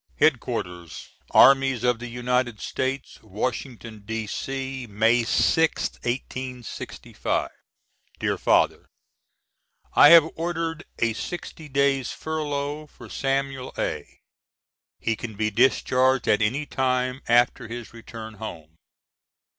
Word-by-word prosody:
] - - -35
HEAD 155 -6 +4
QUARTERS 90 -9 -6 0.2
ARMIES 135 -3 +5
OF 125 -2 +2
THE 120 - -6
UNITED 125 -1 -1
STATES 130 +1 -3
Washington, 115 +1 -5
D.C., 130 +4 -4
May 110 +3 +3
6th, 160 +7 +1
1865. 125 0 -4 0.7
>DEAR - - 0
FATHER: - - +2 1.0
I 145 - +8
have 165 -2 +9
ordered 165 -1 -3
a 115 -1 +1
sixty 160 +3 -7
days' 135 -2 +1
furlough 150 -1 -3
for - - -14
Samuel 135 -1 -2
A. - - -4 0.8
He 115 - 0
can 110 0 -7
be 110 +1 0
discharged 130 +2 +3
at 105 - +3
any 130 +8 0
time 130 -1 -1
after 120 0 +3
his 120 0 -8
return 115 -1 -9
home. 80 -6 -8
125 Hz, 110 wpm, -25 LUFS, 115-135 Hz, 1.0 s, have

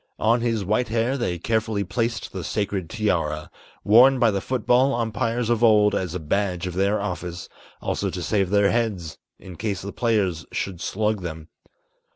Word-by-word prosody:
On 115 +2 +2
his 115 -4 -1
white 110 +6 +1
hair 115 +4 0
they 120 -10 -2
carefully 110 +2 -1
placed 110 +4 -2
the 95 -2 -5
sacred 100 -1 -2
tiara, 80 -8 -1 0.3
Worn 125 +6 +6
by 120 -3 +4
the 100 -1 -2
foot 130 -4 -3
ball 130 +2 +4
umpires 115 +1 -1
of 120 0 +1
old 105 -2 +5
as 90 -2 -2
a - - -2
badge 90 +2 -1
of 90 - -4
their 100 +3 +1
office, 90 -3 -5 0.4
Also - - -1
to - - -5
save 100 -4 +1
their 100 0 +3
heads, 100 -9 -2 0.2
in 90 -3 -11
case 100 -3 -3
the 100 - -6
players 100 -9 0
should 90 -3 -4
slug 105 +1 -1
them. 80 -3 -7
105 Hz, 180 wpm, -24 LUFS, 90-115 Hz, 0.4 s, Worn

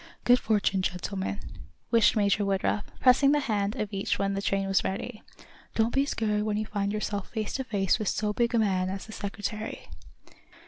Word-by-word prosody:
"Good 245 0 +5
fortune, 205 -4 +1
gentlemen," 190 +2 -3 0.5
wished 230 -2 +5
Major 205 -1 +2
Woodruff, 200 +1 0
pressing 275 +2 +5
the 295 - +3
hand 210 -5 -1
of 210 -1 -3
each 195 0 0
when 195 0 0
the 195 - -2
train 195 -1 0
was 195 -1 +2
ready. 210 +4 -4 0.5
"Don't 225 +1 +2
be 275 +1 +2
scared 210 -5 0
when 210 0 -1
you 215 - -1
find 205 -1 -2
yourselves 205 -1 -3
face 215 -3 -3
to 265 - -2
face 200 -3 +1
with 215 - -2
so 210 +1 0
big 235 +1 +1
a - - +4
man 190 -4 +1
as 195 +1 -5
the 220 - -11
Secretary." 210 +1 -5
210 Hz, 190 wpm, -28 LUFS, 195-220 Hz, 0.5 s, Good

